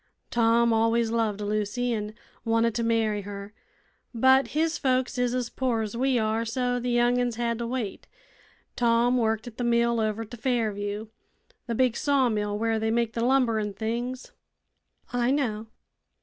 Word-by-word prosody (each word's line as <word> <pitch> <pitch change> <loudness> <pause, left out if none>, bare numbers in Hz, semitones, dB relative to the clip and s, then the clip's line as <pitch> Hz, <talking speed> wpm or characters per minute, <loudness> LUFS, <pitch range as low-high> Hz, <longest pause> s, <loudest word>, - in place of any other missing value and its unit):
Tom 235 0 +3
always 225 0 +2
loved 220 -3 0
Lucy, 215 +4 -1
an' 210 -1 -4 0.3
wanted 230 0 +2
to 235 - -2
marry 225 -2 +1
her; 200 +1 -8 0.6
but 260 +3 +5
his 320 +1 +1
folks 255 -2 0
is 245 0 +1
as 250 -2 -2
poor 245 -4 0
as 215 +1 -5
we 260 +1 +1
are, 220 0 0
so 245 +2 -1
the 245 +1 -3
young 240 +1 +3
'uns 245 -2 -1
had 235 0 -1
to 235 - -3
wait. 235 -5 -4 0.7
Tom 240 +1 +3
worked 220 -1 0
at 240 -2 -10
the 245 - -2
mill 235 0 +2
over 220 +1 -1
t' 240 +3 -10
Fairview 215 -4 -2 0.6
the 235 - -2
big 250 -1 +2
saw 275 -3 +2
mill 210 -1 -1
where 225 0 0
they 220 0 0
make 230 0 0
the 230 - -2
lumber 250 -3 +3
an' 210 -1 -3
things." 240 +4 -4 0.8
"I 245 0 +1
know." 230 -6 -1
230 Hz, 170 wpm, -26 LUFS, 220-245 Hz, 0.8 s, but